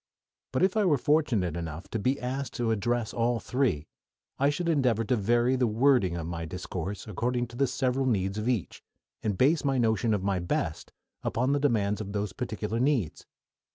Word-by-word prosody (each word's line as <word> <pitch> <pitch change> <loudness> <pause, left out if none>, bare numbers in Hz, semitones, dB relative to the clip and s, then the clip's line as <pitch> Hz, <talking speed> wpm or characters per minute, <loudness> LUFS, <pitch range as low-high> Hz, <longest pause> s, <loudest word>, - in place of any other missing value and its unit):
But - - +1
if 190 +1 +3
I 215 - +3
were 160 -7 +4
fortunate 125 - +1
enough 85 +1 -5
to 115 - -1
be 130 +6 +1
asked 130 +2 -4
to 120 -2 0
address 115 +1 0
all 120 0 +1
three, 110 - 0 0.5
I 140 +1 +4
should 155 +4 -2
endeavor 125 -8 +2
to 120 +3 +1
vary 120 +4 +2
the 125 -2 +2
wording 110 -6 +3
of 85 - -4
my 85 0 -4
discourse 90 +3 -5
according 120 +4 -1
to 120 - -12
the 135 +2 +2
several 130 +1 0
needs 100 -3 0
of 110 +3 -1
each, 115 -8 -2 0.4
and 105 -3 -1
base 150 +5 +3
my 135 -2 +1
notion 110 -2 +2
of 95 - -3
my 100 -2 +1
"best" 85 -1 -2 0.3
upon 125 +4 0
the 145 - +2
demands 110 -7 +1
of 100 -1 -6
those 100 -2 -2
particular 110 -2 -3
needs. 125 - 0
115 Hz, 190 wpm, -28 LUFS, 100-130 Hz, 0.5 s, were